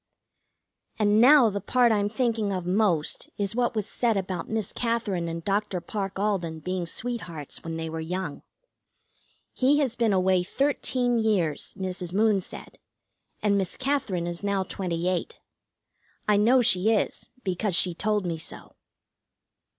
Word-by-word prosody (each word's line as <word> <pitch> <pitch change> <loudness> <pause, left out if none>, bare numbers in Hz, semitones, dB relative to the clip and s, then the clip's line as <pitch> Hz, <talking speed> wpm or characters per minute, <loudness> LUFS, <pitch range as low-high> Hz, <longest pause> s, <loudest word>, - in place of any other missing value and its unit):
And 210 0 +4
now 255 -3 +7
the 200 0 -3
part 245 +3 +3
I'm 205 -1 +1
thinking 225 -2 0
of 185 -2 -3
most 180 -4 +1
is 200 0 -1
what 240 0 0
was 215 -2 -1
said 230 -4 0
about 185 -3 -3
Miss 220 -3 -2
Katherine 230 -7 -1
and 165 0 -5
Dr. 200 -2 0
Parke 195 +2 -4
Alden 190 -6 -1
being 185 0 -3
sweethearts 180 - -5
when 165 0 -4
they 165 0 -3
were 160 0 -5
young. 165 -1 -4 1.1
He 270 +3 +3
has 270 -5 0
been 230 -3 +2
away 185 -1 +3
thirteen 250 +2 0
years, 195 -9 0
Mrs. 185 -2 -4
Moon 210 -1 +3
said, - - -10 0.6
and 200 -1 +3
Miss 190 -3 -3
Katherine 260 -11 -1
is 175 +2 -4
now 200 -1 +1
twenty 175 -2 -3
eight. 185 -1 -2 0.9
I 210 - +4
know 240 +5 +4
she 190 0 +3
is, 215 - -1
because 185 0 -1
she 180 0 +4
told 210 +2 0
me 165 -2 -2
so. - - -8
200 Hz, 150 wpm, -26 LUFS, 180-225 Hz, 1.1 s, now